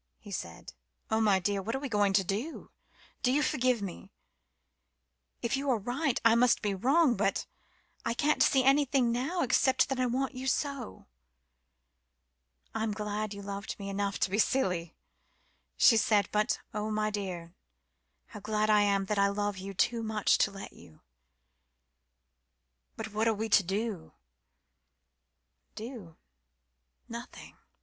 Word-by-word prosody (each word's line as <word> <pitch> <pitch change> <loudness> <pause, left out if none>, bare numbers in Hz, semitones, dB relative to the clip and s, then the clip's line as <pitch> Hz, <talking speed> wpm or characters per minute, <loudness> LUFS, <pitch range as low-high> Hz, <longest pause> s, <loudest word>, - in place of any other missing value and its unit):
he 205 - -13
said. 85 - -7 0.4
"Oh, 220 0 +2
my 205 -3 +4
dear 200 +2 -1
what 225 +5 -3
are - - -2
we 280 - -4
to 205 -4 +2
do? 215 - -4 0.5
Do 250 - +2
you 295 +3 +2
forgive 255 -7 +1
me? 185 -3 -7 1.3
If 235 +2 +1
you 275 +1 -2
are 250 - +3
right, 250 +6 -1
I 230 - +7
must 235 +1 +3
be 205 -1 0
wrong 260 - +3
but 195 0 0 0.6
I 230 - -1
can't 300 +4 +1
see 265 -3 +4
anything 270 -2 +3
now 275 +10 -1
except 260 +2 +3
that 270 -1 -2
I 255 - +2
want 260 +3 -1
you 260 +1 -5
so." 275 - -2 1.7
"I'm 220 -1 -1
glad 210 0 -3
you 200 - -8
loved 200 0 -5
me 200 -1 -6
enough 200 0 -2
to 185 - +1
be 205 - 0
silly," 180 -10 0 0.8
she 230 - +6
said; 210 -2 +3
"but, 210 0 +1
oh, 210 +1 -2
my 215 0 0
dear, 180 -5 -5 0.8
how 210 - -9
glad 215 +1 0
I 210 -1 +5
am 200 -1 +2
that 210 0 -1
I 200 - +5
love 205 -1 -2
you 195 +1 -7
too 235 +5 +1
much 215 -2 +1
to - - +3
let 195 0 -9
you." 80 - -17 1.9
"But 215 -1 -7
what 220 +2 +1
are 225 - +2
we 220 +2 -3
to 205 - +6
do?" 195 -1 -3 1.6
"Do? 220 -8 -8 0.9
Nothing. 235 +2 -9
215 Hz, 150 wpm, -30 LUFS, 200-250 Hz, 1.9 s, I